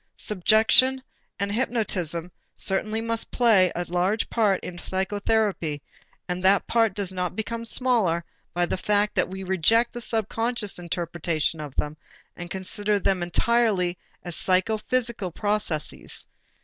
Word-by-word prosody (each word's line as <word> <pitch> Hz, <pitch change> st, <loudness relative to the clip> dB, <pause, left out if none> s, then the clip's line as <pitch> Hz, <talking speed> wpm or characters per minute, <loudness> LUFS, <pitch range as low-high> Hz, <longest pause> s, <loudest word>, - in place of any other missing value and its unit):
Suggestion 220 Hz, +6 st, +3 dB, 0.4 s
and 200 Hz, 0 st, -1 dB
hypnotism 190 Hz, -, -1 dB, 0.2 s
certainly 215 Hz, +3 st, 0 dB
must 230 Hz, 0 st, -1 dB
play 215 Hz, -7 st, +4 dB
a 175 Hz, -, -2 dB
large 180 Hz, +5 st, 0 dB
part 210 Hz, -5 st, +2 dB
in 175 Hz, -1 st, -7 dB
psychotherapy 190 Hz, -4 st, -1 dB, 0.5 s
and 180 Hz, 0 st, -3 dB
that 190 Hz, +1 st, +4 dB
part 225 Hz, -4 st, +2 dB
does 195 Hz, -2 st, -2 dB
not 180 Hz, -1 st, -2 dB
become 230 Hz, +2 st, -3 dB
smaller 225 Hz, -10 st, +1 dB, 0.3 s
by 175 Hz, 0 st, +1 dB
the 175 Hz, -, -2 dB
fact 210 Hz, +2 st, +1 dB
that 180 Hz, -2 st, +1 dB
we 190 Hz, +1 st, -6 dB
reject 190 Hz, +6 st, +3 dB
the 240 Hz, -, -5 dB
subconscious 225 Hz, -2 st, -1 dB
interpretation 170 Hz, -2 st, -2 dB
of 145 Hz, -3 st, -8 dB
them 150 Hz, +1 st, -2 dB, 0.4 s
and 175 Hz, 0 st, -8 dB
consider 205 Hz, +3 st, -1 dB
them 190 Hz, -2 st, +1 dB
entirely 185 Hz, 0 st, +2 dB, 0.3 s
as 175 Hz, -3 st, -5 dB
psychophysical 220 Hz, +2 st, 0 dB
processes. 205 Hz, -4 st, -2 dB
195 Hz, 130 wpm, -25 LUFS, 175-225 Hz, 0.5 s, play